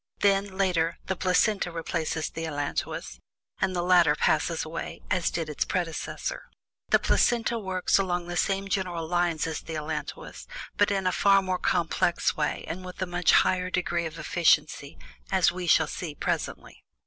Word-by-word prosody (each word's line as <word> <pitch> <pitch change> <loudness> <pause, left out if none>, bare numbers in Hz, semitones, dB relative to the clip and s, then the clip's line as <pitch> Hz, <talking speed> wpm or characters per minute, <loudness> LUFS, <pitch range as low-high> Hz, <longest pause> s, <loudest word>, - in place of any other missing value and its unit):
Then, 195 -1 +2
later, 170 -4 +1
the 190 - -1
placenta 185 +1 +1
replaces 165 -1 -2
the 165 - -5
allantois, 145 - -4 0.4
and 190 -1 +1
the 175 - 0
latter 175 -4 +5
passes 160 +2 +1
away 165 +1 -6
as 180 -2 +2
did 165 -2 -3
its 150 - -1
predecessor. 170 -3 -3 0.4
The - - +6
placenta 235 -1 +1
works 190 -2 +1
along 180 -2 -1
the 175 - -4
same 195 +2 0
general 180 -4 -2
lines 175 -2 +1
as 160 -1 -3
the 165 - -7
allantois, 150 -1 -6 0.3
but 205 - +3
is 195 -2 -1
a 185 - +3
far 195 +2 +4
more 185 -1 -1
complex 175 -1 +1
way 150 -1 -2
and 185 +3 -5
with 180 0 -9
a 185 - 0
much 175 -1 +2
higher 185 0 +3
degree 175 -2 -1
of 160 0 -10
efficiency, 165 - +1 0.3
as - - +4
we 180 0 -5
shall 160 -1 +5
see 155 0 -6
presently. - - -4
175 Hz, 165 wpm, -27 LUFS, 160-185 Hz, 0.4 s, The